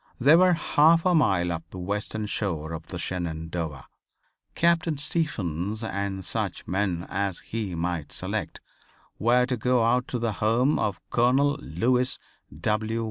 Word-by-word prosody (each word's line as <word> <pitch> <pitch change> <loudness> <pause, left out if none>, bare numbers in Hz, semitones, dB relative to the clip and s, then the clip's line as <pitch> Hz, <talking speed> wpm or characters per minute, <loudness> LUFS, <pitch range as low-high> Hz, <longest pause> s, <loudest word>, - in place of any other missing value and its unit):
They 140 +6 +7
were 180 +1 +6
half 165 0 +4
of 185 - +4
a - - +3
mile 95 - +3
up 80 -1 -5
the 95 - -10
western 105 +3 -3
shore 85 -7 -2
of 80 - -7
the - - -6
Shenandoah. 80 -4 -4 0.7
Captain 170 -2 +2
Stephens, 110 - -2
and 100 -3 -3
such - - -3
men 95 -3 -1
as 100 -2 -2
he 105 -5 -4
might 85 -3 -3
select, - - -3 0.6
were 120 +3 +4
to 125 0 -1
go 125 +1 +2
out 125 +2 +2
to 125 - -2
the 115 -1 -1
home 120 +7 +3
of 100 -2 -1
Colonel 130 +4 +3
Lewis 125 +9 +1 0.4
W. 110 +4 0
105 Hz, 150 wpm, -26 LUFS, 90-125 Hz, 0.7 s, They